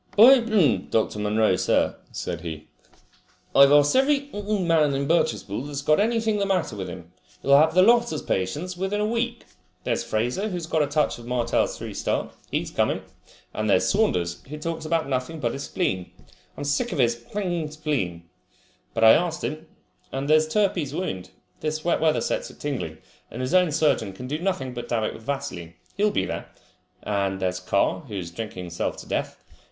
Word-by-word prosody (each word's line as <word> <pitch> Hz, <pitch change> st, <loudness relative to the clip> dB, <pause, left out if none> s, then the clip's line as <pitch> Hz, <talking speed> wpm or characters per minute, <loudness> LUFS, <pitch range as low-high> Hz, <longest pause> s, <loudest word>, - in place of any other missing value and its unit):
"By, 250 Hz, +5 st, +9 dB, 0.5 s
Dr. 110 Hz, -1 st, 0 dB
Munro, 105 Hz, +1 st, +2 dB
sir," -, -, +2 dB, 0.2 s
said -, -, -4 dB
he, 80 Hz, -2 st, -6 dB, 0.9 s
"I've 140 Hz, 0 st, +8 dB
asked 145 Hz, 0 st, +5 dB
every 280 Hz, +1 st, +2 dB
man 175 Hz, -8 st, +1 dB
in 140 Hz, 0 st, -1 dB
Birchespool 120 Hz, -, 0 dB
that's 140 Hz, -1 st, -5 dB
got 155 Hz, +1 st, +3 dB
anything 220 Hz, -1 st, +1 dB
the 200 Hz, -, 0 dB
matter 180 Hz, -, 0 dB
with 95 Hz, -2 st, -5 dB
him. 85 Hz, -1 st, -10 dB, 0.3 s
You'll 140 Hz, +1 st, +5 dB
have 160 Hz, +2 st, +3 dB
the 185 Hz, -, +7 dB
lot 235 Hz, 0 st, +5 dB
as 155 Hz, -, -4 dB
patients 150 Hz, -, -2 dB
within 190 Hz, +3 st, -2 dB
a 210 Hz, -, +1 dB
week. 235 Hz, +2 st, -2 dB, 0.4 s
There's -, -, -1 dB
Fraser, 125 Hz, -, -1 dB
who's 175 Hz, -4 st, -4 dB
got 160 Hz, -1 st, +1 dB
a 145 Hz, -, +2 dB
touch 145 Hz, -3 st, 0 dB
of 120 Hz, -, -11 dB
Martell's 125 Hz, -1 st, 0 dB
three -, -, -6 dB
star. -, -, -2 dB, 0.2 s
He's -, -, -2 dB
coming. -, -, 0 dB, 0.5 s
And 110 Hz, 0 st, -2 dB
there's 95 Hz, -, +4 dB
Saunders, 90 Hz, -, +1 dB
who 150 Hz, -, -6 dB
talks 165 Hz, +1 st, -4 dB
about 160 Hz, -2 st, 0 dB
nothing 135 Hz, +4 st, -2 dB
but 120 Hz, -5 st, -1 dB
his 140 Hz, -, -5 dB
spleen. 95 Hz, -, -2 dB, 0.5 s
I'm -, -, -5 dB
sick 145 Hz, 0 st, 0 dB
of -, -, -3 dB
his 120 Hz, -3 st, +3 dB, 0.6 s
spleen! 140 Hz, -, -2 dB, 0.7 s
But -, -, +1 dB
I 110 Hz, -, +10 dB
asked 165 Hz, +1 st, +2 dB
him. 155 Hz, +2 st, -4 dB, 0.4 s
And 135 Hz, +1 st, -3 dB
there's 155 Hz, +1 st, +4 dB
Turpey's 165 Hz, -5 st, 0 dB
wound! 125 Hz, -, -4 dB, 0.3 s
This 155 Hz, 0 st, -3 dB
wet 175 Hz, -, +1 dB
weather 160 Hz, -1 st, +3 dB
sets -, -, -2 dB
it -, -, -16 dB
tingling, 125 Hz, -, -4 dB, 0.3 s
and 120 Hz, -, -8 dB
his 130 Hz, +5 st, -2 dB
own 180 Hz, -3 st, +4 dB
surgeon 140 Hz, -10 st, +1 dB
can 125 Hz, +7 st, -8 dB
do 145 Hz, +4 st, -3 dB
nothing 170 Hz, -9 st, -2 dB
but 120 Hz, -1 st, -6 dB
dab 115 Hz, -2 st, 0 dB
it -, -, -1 dB
with -, -, -11 dB
vaseline. 115 Hz, -10 st, -5 dB, 0.2 s
He'll 210 Hz, +2 st, +3 dB
be 95 Hz, -, 0 dB
there. -, -, -5 dB, 0.5 s
And 100 Hz, -2 st, -1 dB
there's 90 Hz, -1 st, -1 dB
Carr, 95 Hz, +2 st, +1 dB
who 105 Hz, -, -7 dB
is 85 Hz, -3 st, -5 dB
drinking 95 Hz, -1 st, -6 dB
himself 85 Hz, -1 st, -3 dB
to -, -, -10 dB
death. -, -, -2 dB
145 Hz, 190 wpm, -25 LUFS, 110-175 Hz, 0.9 s, I